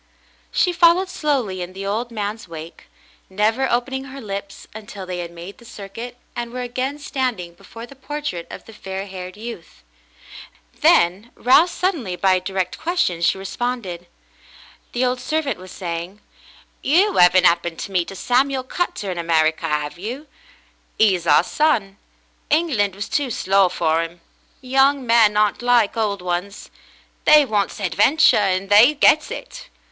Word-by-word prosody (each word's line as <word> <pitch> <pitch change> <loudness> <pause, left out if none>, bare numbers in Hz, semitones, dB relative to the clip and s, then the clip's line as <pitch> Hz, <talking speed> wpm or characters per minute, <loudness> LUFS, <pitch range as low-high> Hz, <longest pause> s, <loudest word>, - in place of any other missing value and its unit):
She 360 - +2
followed 345 +2 +4
slowly 265 - -1
in 180 +1 -6
the 195 +1 -7
old 220 +5 -2
man's 215 -2 -5
wake, 165 0 -10 0.4
never 220 +7 +1
open 245 +2 -1
ing 265 0 -3
her 275 0 -9
lips 200 -4 -7
until 205 -3 -9
they 180 -1 -5
had 170 -1 -5
made 170 +3 -11
the - - -16
circuit 230 +3 -9 0.2
and 235 -1 -4
were 250 0 -4
again 255 +3 -3
standing 250 -11 -3
before 225 +6 -11
the 275 - -15
portrait 280 - -5
of - - -10
the 225 - -13
fair 195 -2 -6
haired 185 -1 -8
youth. 210 - -10 0.9
Then, 185 +7 +3
roused 310 +8 +4
suddenly 305 - -1
by 190 +1 +2
a 185 - +2
direct 185 -1 -3
question, 330 - -1
she 170 - +2
responded. 195 -3 -4 0.9
The 245 +1 +1
old 250 0 -1
servant 305 -1 -2
was 185 0 -11
saying: 175 +2 -6 0.6
"You 375 +8 +3
'aven't 180 +1 +6
'appened 170 -1 +2
to 200 - -6
meet 180 -3 0
a 195 - -9
Samuel 260 +5 +1
Cutter 260 - -3
in 175 - -5
America, 160 -1 +1
'ave 150 +2 -3
you 240 +7 -5
"^ - - -26 0.7
'E's 185 -6 +2
our - - +5
son. 210 -6 0 0.5
England 255 - +1
was 200 +1 -5
too 285 -3 -1
slow 195 -4 +2
for 165 -2 0
'im. 170 +1 -9 0.4
Young 270 +1 +2
men 225 -3 +4
aren't 210 +1 +2
like 240 -3 +3
old 205 -4 -1
ones; 180 +3 -4 0.5
they 300 -1 +7
wants 205 -5 -1
hadventure, 205 - +3
and 195 -1 0
they 230 +9 +7
gets 305 +2 +4
it. - - -9
210 Hz, 160 wpm, -21 LUFS, 185-255 Hz, 0.9 s, they